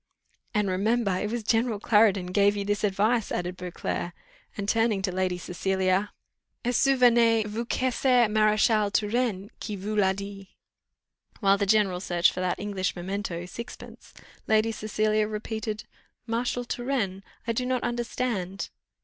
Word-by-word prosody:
"And 210 Hz, -1 st, +2 dB
remember, 205 Hz, +3 st, +1 dB
it 205 Hz, +3 st, -2 dB
was 235 Hz, 0 st, -3 dB
general 225 Hz, 0 st, +1 dB
Clarendon 205 Hz, -4 st, +3 dB
gave 200 Hz, +1 st, +4 dB
you 200 Hz, -, -2 dB
this 205 Hz, +1 st, -1 dB
advice," 210 Hz, +3 st, +1 dB
added 180 Hz, +1 st, -2 dB
Beauclerc, 180 Hz, -1 st, -4 dB, 0.4 s
and 200 Hz, -1 st, -3 dB
turning 225 Hz, -3 st, +2 dB
to 190 Hz, -, 0 dB
Lady 185 Hz, -1 st, -1 dB
Cecilia 190 Hz, +2 st, 0 dB, 0.5 s
"'Et 245 Hz, -, +1 dB
souvenez 235 Hz, -4 st, +4 dB
vous 220 Hz, +3 st, -3 dB
que 260 Hz, +1 st, 0 dB
c'est 250 Hz, -2 st, +3 dB
Maréchal 215 Hz, 0 st, +3 dB
Turenne 210 Hz, -1 st, 0 dB
qui 210 Hz, -, -4 dB
vous 205 Hz, +3 st, -4 dB
l'a 195 Hz, -2 st, +4 dB
dit.'" 200 Hz, 0 st, -8 dB, 0.9 s
While 195 Hz, -2 st, +3 dB
the 200 Hz, -, +1 dB
general 195 Hz, -3 st, +3 dB
searched 175 Hz, -2 st, +2 dB
for -, -, -6 dB
that 185 Hz, -1 st, -1 dB
English 195 Hz, -2 st, -2 dB
memento, 180 Hz, -1 st, -4 dB
six 235 Hz, +7 st, -7 dB
pence, -, -, -14 dB, 0.4 s
Lady 220 Hz, +1 st, +3 dB
Cecilia 215 Hz, 0 st, 0 dB
repeated, 215 Hz, 0 st, -4 dB, 0.4 s
"Marshal 245 Hz, +1 st, -1 dB
Turenne! 240 Hz, -7 st, -2 dB, 0.2 s
I 230 Hz, -, 0 dB
do 250 Hz, -, -1 dB
not 255 Hz, -1 st, 0 dB
understand." 235 Hz, -5 st, -2 dB
210 Hz, 150 wpm, -27 LUFS, 195-230 Hz, 0.9 s, gave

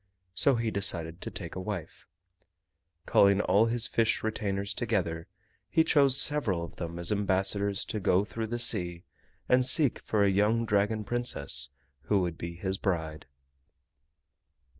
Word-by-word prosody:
So 135 Hz, +8 st, +3 dB
he 115 Hz, -1 st, -2 dB
decided 85 Hz, -4 st, 0 dB
to -, -, -5 dB
take 85 Hz, -4 st, -9 dB
a -, -, -6 dB
wife. 95 Hz, -4 st, -7 dB, 1.0 s
Calling 100 Hz, 0 st, +3 dB
all 105 Hz, +2 st, +2 dB
his 115 Hz, 0 st, +1 dB
fish 115 Hz, -1 st, 0 dB
retainers 100 Hz, -2 st, -3 dB
together, 90 Hz, -8 st, -3 dB, 0.4 s
he 160 Hz, -, +3 dB
chose 140 Hz, -4 st, +4 dB
several 115 Hz, -, +3 dB
of 85 Hz, -, -10 dB
them 85 Hz, -1 st, -6 dB
as 85 Hz, +2 st, +2 dB
ambassadors 100 Hz, 0 st, 0 dB
to 110 Hz, -, -4 dB
go 95 Hz, 0 st, +1 dB
through 110 Hz, +1 st, -6 dB
the 120 Hz, +2 st, -4 dB
sea 90 Hz, -7 st, +2 dB, 0.4 s
and 125 Hz, 0 st, +3 dB
seek 130 Hz, +1 st, +4 dB
for 105 Hz, -2 st, -1 dB
a 100 Hz, -, +2 dB
young 105 Hz, +4 st, +1 dB
Dragon 105 Hz, +1 st, 0 dB
Princess 70 Hz, -, 0 dB, 0.4 s
who 100 Hz, -, +1 dB
would 85 Hz, -2 st, -3 dB
be 85 Hz, +1 st, -7 dB
his 95 Hz, +2 st, -4 dB
bride. 80 Hz, -6 st, -3 dB
100 Hz, 150 wpm, -28 LUFS, 90-115 Hz, 1.0 s, chose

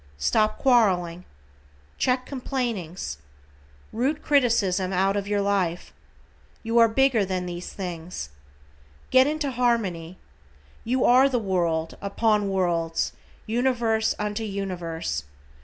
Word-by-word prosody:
Stop 215 Hz, -, +1 dB
quarreling. 185 Hz, -9 st, +2 dB, 0.7 s
Check 255 Hz, 0 st, +1 dB
complainings. 230 Hz, -, -4 dB, 0.7 s
Root 275 Hz, +7 st, -1 dB
criticism 225 Hz, -10 st, +2 dB
out 195 Hz, +1 st, +1 dB
of 200 Hz, -1 st, -2 dB
your 205 Hz, 0 st, +1 dB
life. 190 Hz, -4 st, -1 dB, 0.7 s
You 230 Hz, +1 st, +2 dB
are 230 Hz, -, +7 dB
bigger 245 Hz, -1 st, +3 dB
than 185 Hz, -1 st, -2 dB
these 175 Hz, 0 st, -6 dB
things. 175 Hz, -, -6 dB, 0.8 s
Get 260 Hz, +1 st, +6 dB
into 300 Hz, -2 st, -1 dB
harmony. 205 Hz, -9 st, -1 dB, 0.7 s
You 250 Hz, +2 st, +1 dB
are 255 Hz, +2 st, +6 dB
of 275 Hz, -, +2 dB
the 250 Hz, -, +2 dB
world, 170 Hz, -6 st, -1 dB
upon 205 Hz, 0 st, +1 dB
worlds, 170 Hz, -4 st, 0 dB, 0.3 s
universe 230 Hz, -2 st, +1 dB
unto 210 Hz, +1 st, -3 dB
universe. 175 Hz, -, -4 dB
200 Hz, 110 wpm, -25 LUFS, 180-240 Hz, 0.8 s, are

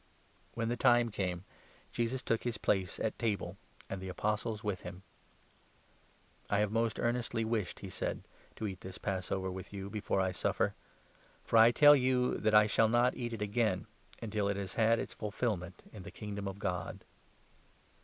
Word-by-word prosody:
When 115 Hz, -1 st, -1 dB
the 120 Hz, -, 0 dB
time 120 Hz, 0 st, +4 dB
came, 90 Hz, -3 st, -2 dB, 0.5 s
Jesus 120 Hz, +2 st, -1 dB
took 115 Hz, -, 0 dB
his 120 Hz, -3 st, -2 dB
place 95 Hz, -4 st, 0 dB
at 110 Hz, -, -2 dB
table, 105 Hz, -6 st, -1 dB, 0.3 s
and 95 Hz, -, -5 dB
the 95 Hz, -, -6 dB
14 -, -, -4 dB
Apostles 105 Hz, +3 st, -2 dB
with 105 Hz, -4 st, -2 dB
him. 90 Hz, +1 st, -8 dB, 0.7 s
" -, -, -33 dB
I 100 Hz, -, +2 dB
have 105 Hz, 0 st, +1 dB
most 115 Hz, 0 st, +1 dB
earnestly 120 Hz, -1 st, 0 dB
wished," 110 Hz, -5 st, -2 dB
he 95 Hz, -, -6 dB
said, -, -, -3 dB, 0.2 s
" -, -, -28 dB
to 110 Hz, -, -4 dB
eat 95 Hz, -3 st, -5 dB
this 95 Hz, 0 st, -8 dB
Pass 95 Hz, -2 st, -2 dB
15 -, -, -1 dB
over 95 Hz, 0 st, -3 dB
with 95 Hz, 0 st, -7 dB
you 100 Hz, -1 st, -6 dB
before 105 Hz, -2 st, -1 dB
I 95 Hz, -1 st, +2 dB
suffer. -, -, 0 dB, 0.7 s
For 115 Hz, -, +2 dB
I 115 Hz, +1 st, +9 dB
tell 145 Hz, +4 st, +8 dB
you 125 Hz, -2 st, +2 dB
that 110 Hz, 0 st, +2 dB
I 105 Hz, 0 st, +8 dB
shall 110 Hz, +1 st, +3 dB
not 120 Hz, +2 st, +4 dB
16 -, -, -6 dB
eat 120 Hz, -, -6 dB
it 110 Hz, -, -5 dB
again, 105 Hz, -2 st, 0 dB, 0.4 s
until 105 Hz, -2 st, -1 dB
it 100 Hz, -, -1 dB
has 95 Hz, -2 st, -4 dB
had 115 Hz, 0 st, +4 dB
its -, -, -4 dB
fulfilment 105 Hz, -4 st, -3 dB
in 105 Hz, -, -8 dB
the -, -, -8 dB
Kingdom 100 Hz, -1 st, -5 dB
of 95 Hz, 0 st, -5 dB
God." 90 Hz, -4 st, -3 dB
105 Hz, 195 wpm, -33 LUFS, 95-115 Hz, 0.7 s, I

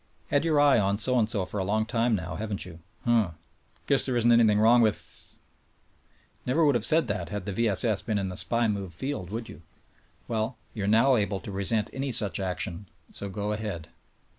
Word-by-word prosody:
Had 145 Hz, +1 st, +1 dB
your 160 Hz, -3 st, +2 dB
eye 145 Hz, -4 st, +5 dB
on 100 Hz, 0 st, 0 dB
so 125 Hz, +4 st, +3 dB
and 110 Hz, -1 st, +1 dB
so 100 Hz, -5 st, -1 dB
for 100 Hz, -, -5 dB
a -, -, -1 dB
long 110 Hz, +3 st, 0 dB
time 115 Hz, 0 st, 0 dB
now, 90 Hz, -3 st, -5 dB
haven't 105 Hz, +3 st, -4 dB
3^ou? 85 Hz, -2 st, -8 dB, 0.3 s
Huh! 115 Hz, -6 st, +2 dB, 0.5 s
Guess 140 Hz, -1 st, +3 dB
there 125 Hz, -2 st, 0 dB
isn't 120 Hz, 0 st, +3 dB
anything 115 Hz, -3 st, +4 dB
wrong 115 Hz, +3 st, +5 dB
with? 110 Hz, -2 st, -3 dB, 1.1 s
Never 145 Hz, +6 st, +1 dB
would 145 Hz, -, +4 dB
have 120 Hz, -4 st, 0 dB
said 160 Hz, +3 st, +4 dB
that 105 Hz, -1 st, -3 dB
had 105 Hz, -2 st, -5 dB
the 100 Hz, -, -3 dB
V. 115 Hz, +4 st, +1 dB
S. 95 Hz, -, +3 dB
S. 110 Hz, -4 st, +1 dB
been 110 Hz, -3 st, -2 dB
in 100 Hz, -1 st, -2 dB
the 90 Hz, -, -5 dB
big -, -, -5 dB
SPY 115 Hz, 0 st, +1 dB
move 100 Hz, -5 st, -4 dB
field, 130 Hz, -6 st, -5 dB
would 115 Hz, +2 st, -5 dB
you? 75 Hz, -, -12 dB, 0.7 s
Well, 115 Hz, +2 st, -2 dB, 0.2 s
you 100 Hz, -3 st, -4 dB
are -, -, -2 dB
now 115 Hz, +5 st, +4 dB
able 100 Hz, -2 st, -1 dB
to -, -, -8 dB
resent 100 Hz, +2 st, 0 dB
any 135 Hz, 0 st, -3 dB
such 105 Hz, -3 st, +3 dB
action, 95 Hz, 0 st, -4 dB, 0.2 s
so 100 Hz, -, -5 dB
go 105 Hz, +2 st, -4 dB
ahead! 105 Hz, -7 st, -5 dB
110 Hz, 220 wpm, -27 LUFS, 100-120 Hz, 1.1 s, eye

